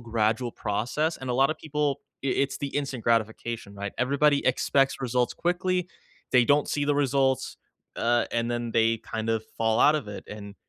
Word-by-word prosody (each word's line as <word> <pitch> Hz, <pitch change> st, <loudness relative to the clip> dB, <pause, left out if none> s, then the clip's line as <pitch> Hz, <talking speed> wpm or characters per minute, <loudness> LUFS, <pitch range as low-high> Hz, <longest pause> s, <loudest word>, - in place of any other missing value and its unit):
gradual 115 Hz, +1 st, 0 dB
process, 120 Hz, +10 st, -1 dB
and 130 Hz, -1 st, -5 dB
a -, -, 0 dB
lotta 135 Hz, +4 st, +3 dB
people 150 Hz, -3 st, -2 dB, 0.2 s
i -, -, +1 dB
it's 135 Hz, +1 st, 0 dB
the 140 Hz, -, -3 dB
instant 135 Hz, -5 st, -3 dB
gratification, 115 Hz, -2 st, -1 dB
right? 100 Hz, 0 st, -5 dB
Everybody 140 Hz, +3 st, +2 dB
expects 135 Hz, +2 st, +2 dB
results 125 Hz, -1 st, 0 dB
quickly. 180 Hz, 0 st, 0 dB, 0.4 s
They 125 Hz, -1 st, +5 dB
don't 145 Hz, +3 st, +3 dB
see 145 Hz, -1 st, 0 dB
the 145 Hz, -, +2 dB
results, 135 Hz, -2 st, +1 dB, 0.4 s
uh, 120 Hz, +1 st, +2 dB
and 115 Hz, 0 st, 0 dB
then 120 Hz, -1 st, -2 dB
they 115 Hz, 0 st, +3 dB
kind 110 Hz, 0 st, -5 dB
of 110 Hz, -1 st, +1 dB, 0.2 s
fall 115 Hz, -1 st, +2 dB
out 150 Hz, -, +6 dB
of 135 Hz, -8 st, -4 dB
it, 105 Hz, -, -7 dB
and 100 Hz, -1 st, -8 dB
125 Hz, 180 wpm, -26 LUFS, 115-140 Hz, 0.4 s, out